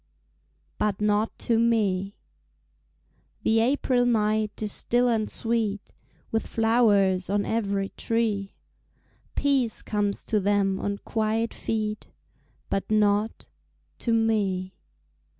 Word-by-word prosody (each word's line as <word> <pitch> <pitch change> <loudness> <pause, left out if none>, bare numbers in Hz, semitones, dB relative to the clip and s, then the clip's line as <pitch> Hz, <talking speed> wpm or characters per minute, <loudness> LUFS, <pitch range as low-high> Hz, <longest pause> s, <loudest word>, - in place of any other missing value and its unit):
But 210 -2 0
Not 210 +1 +1
to 230 -1 +3
Me 205 -4 +1 1.3
The 225 0 +3
April 250 +1 +2
night 215 -2 +1
is 210 - -2
still 245 +4 +1
and 225 -3 +1
sweet 225 -3 -2 0.4
With 225 - -1
flowers 205 -5 +3
on 200 +1 +1
every 200 -3 -1
tree; 215 -4 -1 0.8
Peace 270 -6 +1
comes 205 -1 -1
to 215 - 0
them 200 -1 +1
on 200 0 -2
quiet 225 +1 0
feet, 215 -1 -3 0.6
But 195 - -2
not 210 0 +1 0.5
to 235 - -1
me. 205 -5 +1
215 Hz, 105 wpm, -26 LUFS, 200-225 Hz, 1.3 s, to